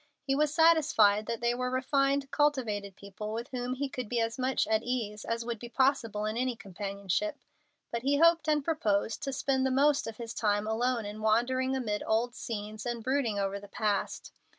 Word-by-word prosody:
He 270 - +1
was 295 +1 +2
satisfied 295 -11 +4
that 230 -1 -3
they 240 0 +2
were 250 +1 -2
refined, 275 +2 +1
cultivated 225 -10 0
people, 200 +2 -7
with 235 +3 -4
whom 250 0 -3
he 280 +2 -2
could 255 -4 -6
be 240 - 0
as 225 +2 -1
much 260 +1 +1
at 220 0 +1
ease 225 -4 -3
as 230 0 -3
would 235 -2 -3
be 240 - -8
possible 235 -5 +1
in 215 +1 -2
any 250 0 0
companionship, 200 - -3 0.5
but 235 - -2
he 280 +3 +2
hoped 335 0 +4
and 300 -2 +2
proposed 220 -9 0
to 275 - -2
spend 265 0 0
the 265 - +2
most 280 +2 +3
of 225 -1 -6
his 230 -1 -6
time 205 -1 +1
alone 230 +1 0
in 210 +1 -7
wandering 255 +4 +2
amid 215 -5 -2
old 230 +2 +1
scenes 215 -2 -5
and 240 -2 -3
brooding 260 -5 0
over 200 0 -1
the 205 - -12
past. 210 -1 -2
240 Hz, 195 wpm, -30 LUFS, 215-265 Hz, 0.5 s, satisfied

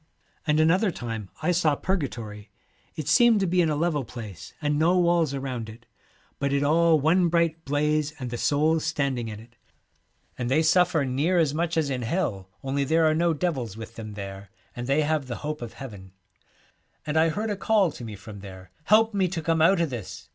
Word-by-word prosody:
'And 150 0 +3
another 180 +7 +3
time 115 - -5
I 180 - +2
saw 160 -4 +2
Purgatory. 115 - -4 0.5
It 155 -3 -5
seemed 225 +7 +5
to - - +2
be 180 0 +2
in 165 - +2
a 150 - 0
level 150 -2 0
place, 110 -7 -9
and 150 -1 0
no 170 +3 +3
walls 170 -5 +2
around 130 -5 -4
it, 115 +2 -13 0.5
but 140 0 0
it 140 0 +1
all 160 +2 +4
one 170 +5 +3
bright 165 -1 +1
blaze, 150 +1 +1
and 125 -4 -6
the 120 - -3
souls 155 +2 +2
standing 140 -7 -1
in 105 -1 -7
it. 115 +1 -17 0.8
And 120 -1 -2
they 155 +5 +3
suffer 175 0 +3
77 130 -2 -2
The 135 - -1
near 180 +4 +2
as 155 -4 +2
much 165 +1 -1
as 150 -3 +1
in 130 -2 -2
Hell, 115 - -2
only 135 +1 0
there 160 +4 +2
are 155 - +4
no 165 +2 +1
Twilight, 145 - -10
devils 130 - -2
with 115 0 -8
them 110 -2 -8
there, 100 -1 -8 0.3
and 120 0 -5
they 140 +3 +2
have 150 -2 0
the 120 - -4
hope 150 -2 -3
of 120 -2 -7
Heaven. 100 -8 -10 0.4
* - - -38
And 150 0 -3
I 160 +1 +4
heard 210 +6 -2
a - - -1
call 200 -3 +2
to 120 - -10
me 110 -2 -6
from 100 +1 -10
there, 95 -2 -11
" - - -36
Help 220 +3 +4
me 195 -2 +2
to 175 -1 -3
come 165 0 +1
out 170 +3 +5
o' 170 - +3
this!" 120 - -7
150 Hz, 225 wpm, -26 LUFS, 120-165 Hz, 0.8 s, seemed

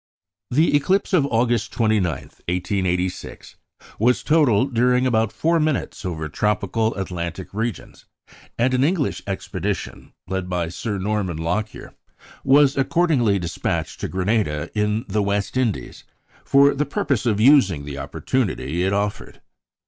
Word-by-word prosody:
The 150 +4 +3
eclipse 190 +8 +1
of 150 -6 +4
August 115 -3 +1
29, 110 -3 +2
1886, 90 +2 -3 0.4
was 125 +3 +2
total 145 -8 +3
during 125 0 +2
about 115 -4 +1
four 165 +1 +1
minutes 155 -8 -1
over 80 -5 -3
tropical 105 +6 0
Atlantic 90 -1 -5
regions; 110 +1 -5 0.5
and 130 +2 +2
an 130 +1 +2
English 155 -1 0
expedition, 95 0 -4 0.2
led 95 -1 -3
by 90 -2 -1
Sir 100 +4 -4
Norman 100 -3 -2
Lockyer, 105 +7 -3 0.5
was 140 0 +5
accordingly 135 - +2
despatched 85 -2 -3
to - - -3
Grenada 95 -5 -1
in 105 +1 0
the 105 +2 0
West 100 +1 -1
Indies, 125 -5 -2 0.4
for 140 +1 +5
the 145 +1 -1
purpose 130 -4 -1
of 105 -3 +1
using 105 - +4
the 70 -1 -6
opportunity 80 - -2
it 95 +1 +1
offered. 100 0 -3
105 Hz, 130 wpm, -22 LUFS, 95-130 Hz, 0.5 s, was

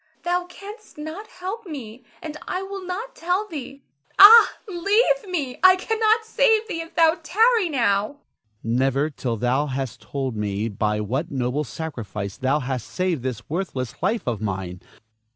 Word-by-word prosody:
Thou 355 0 0
canst 415 +3 -12
not 315 +8 -7
help 385 +3 -7
me, 250 -6 -8 0.2
and 310 -1 -6
I 370 +1 -2
will 390 0 -7
not 405 +8 -5
tell 360 +5 -1
thee. 280 -5 -8 0.3
Ah, 445 +4 +10
leave 410 +5 +1
me! 285 -8 -3
I 370 0 +8
cannot 445 +3 +1
save 450 -1 +2
thee 330 -7 -3
if 330 - -11
thou 330 0 +4
tarry 440 +3 +3
now. 210 -8 +2
Ernest. 285 +3 -16 0.4
Never, 135 +5 +1
till 120 -4 -3
thou 125 +6 +1
hast 130 -4 -4
told 130 +3 -4
me 105 +1 -2
by 105 +1 -1
what 130 +10 -2
noble 130 +2 -1
sacrifice 110 -8 -6
thou 135 +3 +1
hast 125 -2 -4
saved 180 -6 -1
this 120 -3 -5
worthless 140 -7 -4
life 230 - 0
of 115 -4 -2
mine. 95 -3 -4
245 Hz, 160 wpm, -23 LUFS, -, 0.4 s, Ah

